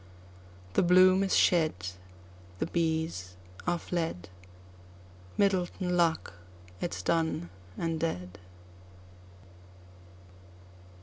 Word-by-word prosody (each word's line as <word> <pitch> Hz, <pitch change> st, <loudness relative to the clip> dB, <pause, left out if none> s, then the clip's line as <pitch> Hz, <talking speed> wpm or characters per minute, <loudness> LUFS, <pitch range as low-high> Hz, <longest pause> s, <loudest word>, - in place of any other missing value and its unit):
The -, -, +4 dB
bloom 185 Hz, +1 st, +6 dB
is 195 Hz, -1 st, +1 dB
shed—The 90 Hz, -, -1 dB
bees 160 Hz, -, -1 dB, 0.3 s
are 175 Hz, 0 st, +2 dB
fled—Myddelton 90 Hz, -, -4 dB
luck 170 Hz, -2 st, +1 dB, 0.5 s
it 175 Hz, -, -2 dB
's -, -, -6 dB
done 160 Hz, -, 0 dB, 0.3 s
and 165 Hz, -1 st, -1 dB
dead. 95 Hz, -, -3 dB
155 Hz, 70 wpm, -30 LUFS, -, 0.5 s, bloom